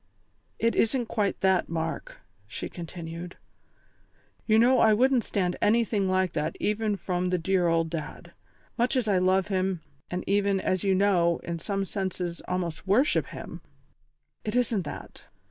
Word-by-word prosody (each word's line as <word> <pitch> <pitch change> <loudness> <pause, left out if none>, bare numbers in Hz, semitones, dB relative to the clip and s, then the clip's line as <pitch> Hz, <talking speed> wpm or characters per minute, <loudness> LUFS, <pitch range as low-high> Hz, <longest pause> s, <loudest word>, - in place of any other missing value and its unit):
"It 230 0 +2
isn't 240 +2 +2
quite 210 -4 -1
that, 190 -1 +2
Mark," 165 - -4 0.3
she - - -5
continued. 170 0 -7 1.1
"You 220 -1 +5
know 250 +3 +5
I 220 -1 +5
wouldn't 255 +1 +3
stand 180 -3 -1
anything 215 -2 +2
like 185 -1 +1
that 155 +1 -2
even 210 0 0
from 180 -1 -2
the 180 - +1
dear 180 +1 +1
old 165 -1 +1
Dad. 155 -3 -6 0.5
Much 245 +3 +2
as 250 -4 +1
I 195 -3 +3
love 185 +2 +2
him, 190 -3 0 0.3
and 180 +1 -3
even, 200 0 +2
as 185 -1 0
you 195 -1 +3
know, 180 -4 +3
in 170 -1 -4
some 195 +3 -2
senses 185 -3 -3
almost 180 -1 -3
worship 240 +10 +3
him, - - -8 0.8
it 215 +1 -3
isn't 230 -7 +1
that. - - -9
190 Hz, 155 wpm, -27 LUFS, 175-215 Hz, 1.1 s, You